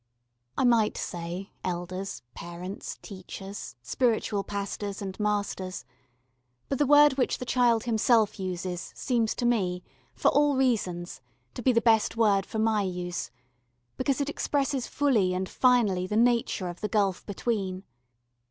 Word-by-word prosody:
I - - +2
might 235 -4 +3
say 175 +3 -5
elders, 185 0 -4
parents, 175 +3 -7
teachers, 195 - -8
spiritual 220 - 0
pastors 200 0 -4
and 195 -2 -5
masters, 200 -6 -2 0.8
but 275 - -1
the 290 - +3
word 290 -1 +6
which 255 - +1
the 250 - -6
child 235 -2 +3
himself 225 -2 +2
uses 180 -1 -4
seems 235 -4 0
to 245 - -2
me, 185 -7 +1 0.3
for 120 - +3
all 290 0 +3
reasons, 200 -10 0 0.3
to 245 - -6
be 255 - +4
the 230 -1 +3
best 225 -1 +3
word 200 -4 +3
for 220 - -5
my 220 -1 +2
use, 180 -2 -3 0.7
because 265 +1 0
it 285 - 0
expresses 280 -2 -1
fully 220 -11 +2
and 185 +1 -2
finally 215 -8 +3
the 210 - -1
nature 235 -5 +2
of 175 0 -7
the 210 - -2
gulf 200 -4 +1
between. 195 -3 -2
210 Hz, 145 wpm, -28 LUFS, 185-240 Hz, 0.8 s, word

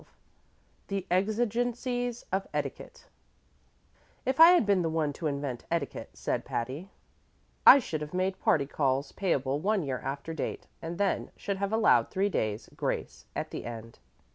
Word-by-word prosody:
XII - - -22 0.8
The 195 -2 -3
Exigencies 240 +4 0
of 195 +1 -1
Etiquette - - -5 1.2
"If 260 +3 0
I 335 +2 +10
had 350 - +4
been 200 -2 +3
the 165 - 0
one 160 -2 0
to 160 - -3
invent 140 -4 -3
etiquette," 165 -5 -2
said - - -2
Patty, 135 +10 -4 0.8
"I - - +12
should 160 - -3
have 150 0 -5
made 185 +1 -1
party 140 -3 +3
calls 140 0 0
payable 140 -7 0
one 200 +2 +1
year 135 -3 -2
after 140 +4 -4
date, 160 - -4 0.2
and 170 +1 -5
then 200 -1 0
should 200 -1 -3
have 200 +1 -2
allowed 220 0 +4
three 195 +1 +1
days' 110 - -2
grace - - -3
at - - -3
the - - -5
end." 115 -1 -8
180 Hz, 160 wpm, -29 LUFS, 140-210 Hz, 1.2 s, I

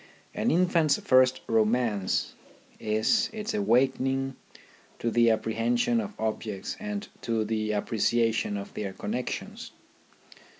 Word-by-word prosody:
An - - 0
infant's 170 -4 +3
first 130 0 +4
romance 110 -3 +1 0.5
is 110 - +1
its 215 -1 -4
awakening 130 +4 +1 0.6
to 115 - -2
the 115 0 +4
apprehension 115 - +1
of 210 -1 -8
objects 110 -3 -3
and 210 0 -4
to 115 -2 -1
the 110 0 -1
appreciation 115 0 +1
of 100 - -7
their 100 -2 -4
connexions. 120 +6 -5
115 Hz, 110 wpm, -27 LUFS, 110-135 Hz, 0.6 s, first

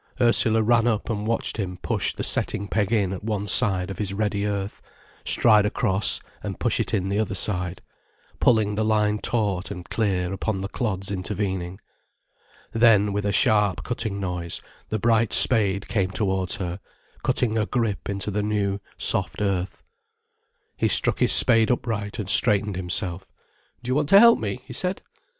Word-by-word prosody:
Ursula 115 -2 +2
ran 115 +1 +2
up 110 0 -1
and 105 -1 -4
watched 115 0 -2
him 90 -4 -4
push - - -1
the - - -6
setting 100 - -1
peg 105 0 -1
in 100 -5 0
at 95 - -8
one 105 -2 -3
side 95 -1 +1
of 95 - -8
his 100 -2 -3
ready 105 -1 -1
earth, 100 -1 -4 0.4
stride 105 -3 +4
across, 100 -2 +2 0.2
and - - -6
push - - 0
it - - -2
in 95 -4 -1
the 100 +2 -1
other 110 -3 -2
side, 90 -2 -1 0.6
pulling 110 -4 +2
the 110 +1 -1
line 105 -1 +1
taut 100 -6 -2
and 90 -3 -8
clear 95 -4 -1
upon 95 +1 -3
the 100 - -4
clods 100 -4 -3
intervening. 95 -2 -4 0.9
Then 110 -3 +3
with 105 0 -2
a - - 0
sharp 105 -2 +2
cutting 110 -5 -3
noise 90 -3 -4 0.3
the 110 - -2
bright 115 +1 +1
spade 100 -5 +6
came 95 -4 -1
towards 95 -2 -1
her, 90 -3 -5 0.4
cutting 125 -3 0
a 110 -1 0
grip 115 -7 -2
into 100 +1 -3
the 105 +1 -2
new, 100 -1 -2 0.2
soft - - +1
earth. 95 -3 -3 0.9
He - - +1
struck - - +1
his - - +3
spade 115 -1 +6
upright 110 -4 -3
and 105 -5 -5
straightened 105 -1 +3
himself. 90 0 -3 0.5
"Do 125 - -6
you - - +1
want 145 +1 0
to 195 - +8
help 235 +1 +6
me?" 110 +3 -5
he - - -10
said. 185 0 -4
105 Hz, 170 wpm, -23 LUFS, 95-110 Hz, 0.9 s, to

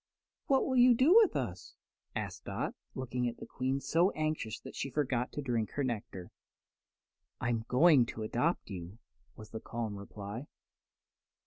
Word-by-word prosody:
"What 270 -1 +3
will 260 -1 +1
you 245 0 +7
do 265 +9 +5
with 445 0 +6
us?" - - -4 0.4
asked - - -4
Dot, - - -2 0.2
looking 125 -1 -2
at 120 - -9
the - - -8
Queen 130 +2 -1
so 170 +6 +3
anxiously 155 -8 -2
that - - -9
she 135 - -3
forgot 130 -3 0
to 145 - -4
drink 120 -4 -1
her 145 - -1
nectar. 105 -7 -4 1.1
"I'm 115 -2 -1
going 135 -2 +6
to 110 - -5
adopt 120 +4 0
you," 90 +2 -7 0.4
was 110 -1 -12
the 110 - -5
calm 115 -3 -4
reply. 105 +6 -7
125 Hz, 155 wpm, -32 LUFS, 110-155 Hz, 1.1 s, you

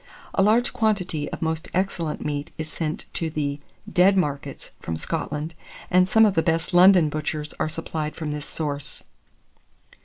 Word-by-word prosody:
A - - +2
large 220 +5 +3
quantity 185 -9 0
of - - -4
most 160 0 -2
excellent 175 -4 -1
meat 145 +1 -2
is 155 -1 -4
sent 155 0 -3
to 165 - -1
the 145 -2 -2 0.3
"dead 190 +2 +4
markets" 145 -6 -2
from 80 - -4
Scotland, 155 - -3 0.4
and 185 +1 +4
some 220 +2 +6
of 205 - +3
the 165 - +3
best 165 +2 0
London 180 -2 +7
butchers 150 0 -3
are - - 0
supplied 155 -1 -4
from 155 -2 -4
this 150 -1 -5
source. 145 -3 -4
160 Hz, 160 wpm, -24 LUFS, 150-180 Hz, 0.4 s, London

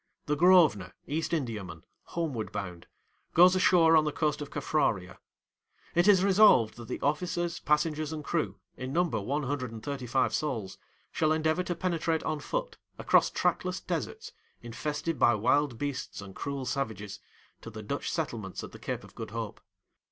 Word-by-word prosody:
The 150 - 0
Grosvenor, 165 - +5
East 155 +3 -2
Indiaman, 105 - -3 0.2
homeward 145 -10 -3
bound, 90 -3 -6 0.5
goes 180 +2 +7
ashore 170 -3 +5
on 155 - +6
the 150 - -1
coast 150 0 -1
of 145 - -5
Caffraria. 115 -11 -1 0.7
It 175 +3 +3
is 190 -3 +6
resolved 195 - +5
that 120 -1 -9
the - - -4
officers, 170 +3 -1
passengers, 150 0 0
and 155 -1 -5
crew, 160 +1 -1 0.2
in 130 +1 -5
number 165 - +1
one 145 +9 -2
hundred 130 -3 -3
and 110 -1 -9
thirty 135 -2 -4
five 130 +2 +1
souls, 115 -11 -3 0.3
shall 155 -1 +1
endeavour 160 +2 +1
to 180 -1 -3
penetrate 165 -2 -1
on 155 -1 -2
foot, - - -4 0.2
across - - +4
trackless - - -1
deserts, 450 +1 -4 0.3
infested 150 +6 -3
by 120 - +5
wild 130 +4 +2
beasts 140 0 -4
and 100 -1 -9
cruel 140 +2 -4
savages, 110 -6 -3 0.4
to - - -8
the 110 -1 -8
Dutch 140 +7 -3
settlements 115 - -4
at - - -8
the - - -12
Cape - - -4
of - - -15
Good - - -7
Hope. - - -5
150 Hz, 165 wpm, -29 LUFS, 115-165 Hz, 0.7 s, goes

